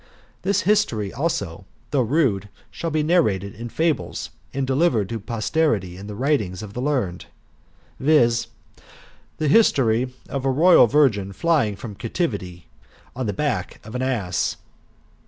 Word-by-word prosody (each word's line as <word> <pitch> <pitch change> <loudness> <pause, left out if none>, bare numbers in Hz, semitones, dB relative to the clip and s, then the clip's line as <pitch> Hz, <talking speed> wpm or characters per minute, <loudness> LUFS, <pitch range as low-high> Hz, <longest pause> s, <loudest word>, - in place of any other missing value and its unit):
This 200 +2 +1
history, 145 - +1
also, 105 - -2 0.3
though 140 -2 +2
rude, 115 -6 +1 0.2
shall 170 - -4
be 155 -1 0
narrated 105 - +1
in 115 +2 -7
fables, 160 +6 -1 0.2
and 135 0 -1
delivered 130 - +1
to 115 - -3
posterity 110 - 0
in 100 +2 -9
the 105 - -6
writings 110 -7 0
of 100 -2 -9
the 125 - -4
learned; 125 -11 -1 0.7
viz. 120 -5 +3 0.9
the 155 - 0
history 130 - +3 0.2
of 135 -2 -4
a 135 - +1
ROYAL 155 0 +6
VIRGIN 110 -8 +2
rLYING 140 - +1
FROM 105 +1 -7
CAPTIVITY 100 - -3 0.5
ON 130 -2 -3
THE 105 - -1
BACK 120 -6 -2
OF 110 - -10
AN 125 - -2
ASS. 105 -10 -1
120 Hz, 140 wpm, -23 LUFS, 100-150 Hz, 0.9 s, ROYAL